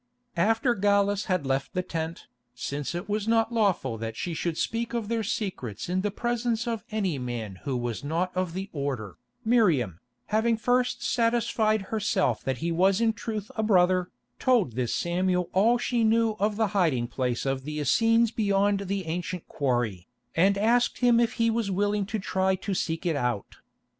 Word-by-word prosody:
After 225 +8 +2
Gallus 200 -1 +2
had 185 -7 0
left 135 +4 -1
the 180 - 0
tent, 165 -1 -4 0.3
since 140 +5 -4
it 175 - -4
was 210 0 -2
not 225 0 +2
lawful 185 - +1
that 115 0 -5
she 175 - -3
should 165 +1 -2
speak 230 +1 -2
of 225 -3 -2
their 230 -1 0
secrets 185 - -4
in 185 +1 +1
the 205 - 0
presence 235 +2 -1
of 230 -2 -2
any 195 -9 -1
man 115 -6 -5
who 135 -3 -1
was 120 -1 -3
not 170 +5 -1
of 185 -2 -1
the 190 +1 -3
order, 135 - -4 0.3
Miriam, 165 - +2 0.3
having 225 +1 +3
first 245 +2 +1
satisfied 230 -3 +1
herself 210 -2 +1
that 130 -1 -1
he 170 - 0
was 185 +4 +3
in 230 -1 +2
truth 215 -2 -5
a 220 - 0
brother, 185 -3 +3 0.3
told 240 - +3
this 120 0 -1
Samuel 180 0 0
all 225 +6 +4
she 240 -1 0
knew 225 0 +3
of 210 +1 +1
the 220 -1 +1
hiding 155 -12 +2
place 125 0 -2
of 135 -1 -1
the 150 +2 -4
Essenes 225 - +3
beyond 200 -2 +1
the 195 -1 -2
ancient 175 +1 -4
quarry, 120 - -1 0.3
and 195 +4 +4
asked 235 +4 +2
him 240 -1 +5
if 235 0 +2
he 230 -1 +2
was 225 -2 -1
willing 205 +1 0
to 220 - -2
try 190 -1 0
to 190 +2 -4
seek 165 -1 -2
it 165 -3 +1
out. 125 -7 -2
190 Hz, 180 wpm, -27 LUFS, 150-225 Hz, 0.3 s, him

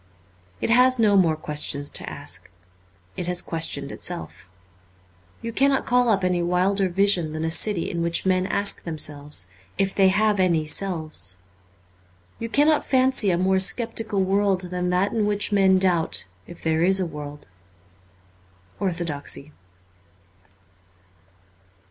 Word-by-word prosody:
It - - 0
has 255 +2 +5
no 215 -3 +3
more 170 -5 +3
questions 150 -2 0
to - - +2
ask; - - -5 0.7
it 175 - -5
has 180 0 0
questioned 155 -5 -1
itself. 170 - -7 0.9
You 230 0 -5
cannot 275 +2 +2
call 245 -1 +2
up 195 -3 +2
any 180 -1 +1
wilder 185 +3 +1
vision 180 -4 +2
than 155 +1 -3
a 160 - -1
city 185 0 +1
in 170 - -3
which 170 +2 0
men 185 0 +1
ask 200 0 -1
themselves 150 - -2 0.3
if 195 0 0
they 195 -1 +4
have 210 +1 +2
any 170 -4 +2
selves. 155 - -3 1.0
You 230 - -5
cannot 295 +5 +3
fancy 260 -5 +2
a 175 - +1
more 190 +1 +2
sceptical 215 0 0
world 195 0 +1
than 180 0 -2
that 180 +3 +1
in 215 -2 0
which 205 0 0
men 195 -2 +4
doubt 180 - +2 0.2
if 175 - -12
there 160 0 +1
is 190 +2 +3
a 185 - 0
world. 150 -2 -8 0.7
' 90 0 -33
Orthodoxy.' 160 -5 -3
185 Hz, 140 wpm, -23 LUFS, 160-200 Hz, 1.0 s, has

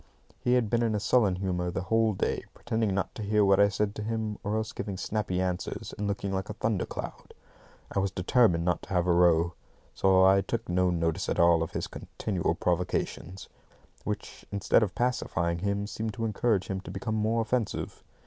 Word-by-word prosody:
He 125 - +1
had 120 -3 +2
been 115 +2 +1
in 115 -2 +1
a - - 0
sullen 105 -3 +3
humour 90 -2 -2
the 90 - -3
whole 110 +2 +2
day, 95 - -1
pretending 110 -4 -1
not 100 - -1
to - - -7
hear 105 0 +3
what 100 0 +4
I 100 0 +6
said 105 0 -1
to 105 - -6
him, 110 -1 -3
or 105 +1 -1
else 110 0 -2
giving 100 -2 -5
snappy 95 -2 -2
answers, 90 -1 -3
and 105 - -3
looking 100 -1 -2
like 95 +2 -2
a 105 - -5
thunder 110 -3 -1
cloud. - - -7 0.6
I - - 0
was 100 0 +1
determined 90 -2 +2
not 90 - +1
to - - -13
have 90 -2 +1
a 90 - +3
row, 85 -1 +4 0.4
so 95 -1 +4
I 95 +1 +6
took 115 +4 -3
no 90 +1 +2
notice 85 +1 -1
at - - -1
all 85 -1 +5
of 80 - -3
his - - -2
continual 95 -5 -3
provocations, 90 +1 -2 0.6
which, - - -5
instead 100 +2 +3
of 105 -4 -1
pacifying 85 -9 0
him, 100 +2 -1
seemed 110 +1 -4
to 115 -2 -2
encourage 110 -3 +1
him 95 -1 -3
to - - -10
become 100 +5 -3
more 110 +1 +1
offensive. 115 -1 -2
100 Hz, 205 wpm, -28 LUFS, 90-110 Hz, 0.6 s, I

